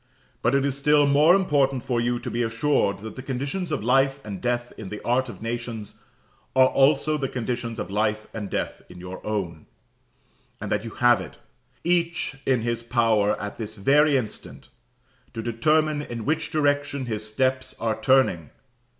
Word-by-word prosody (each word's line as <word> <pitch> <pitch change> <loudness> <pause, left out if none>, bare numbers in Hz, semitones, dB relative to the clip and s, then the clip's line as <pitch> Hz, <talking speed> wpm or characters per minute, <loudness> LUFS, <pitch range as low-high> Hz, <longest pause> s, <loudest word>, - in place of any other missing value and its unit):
But 120 +4 +2
it 140 0 +2
is 140 -2 0
still 145 +1 +4
more 150 +5 +5
important 140 -9 +1
for 120 -2 0
you 120 +1 0
to - - -5
be 120 - -1
assured 115 -3 +1
that 110 +1 -8
the 130 - -6
conditions 140 +7 -3
of 150 -8 -2
life 135 +3 +3
and 100 -3 -6
death 120 0 -1
in 105 -4 -8
the 105 - -6
art 125 +1 +1
of 115 - -10
nations 115 -2 -5 0.5
are 130 0 +6
also 150 +2 +3
the 135 -2 -2
conditions 120 -1 -3
of - - -5
life 105 +1 0
and 105 -3 -5
death - - -3
in 90 - -12
your 90 +1 -8
own; 90 -7 -4 0.9
and - - -5
that - - 0
you 115 - -5
have 120 0 +4
it, - - -10 0.5
each 170 -4 0
in 125 -4 +2
his 115 0 -1
power 115 -3 +2
at 105 +2 -6
this 110 -1 -5
very 140 +7 +4
instant, 110 -5 -6 0.7
to 115 - -4
determine 150 +6 +1
in 115 -6 -6
which 155 +2 0
direction 145 -2 0
his 110 -3 -3
steps 130 +2 0
are 110 -1 -1
turning. 130 - +3
125 Hz, 175 wpm, -25 LUFS, 110-140 Hz, 0.9 s, are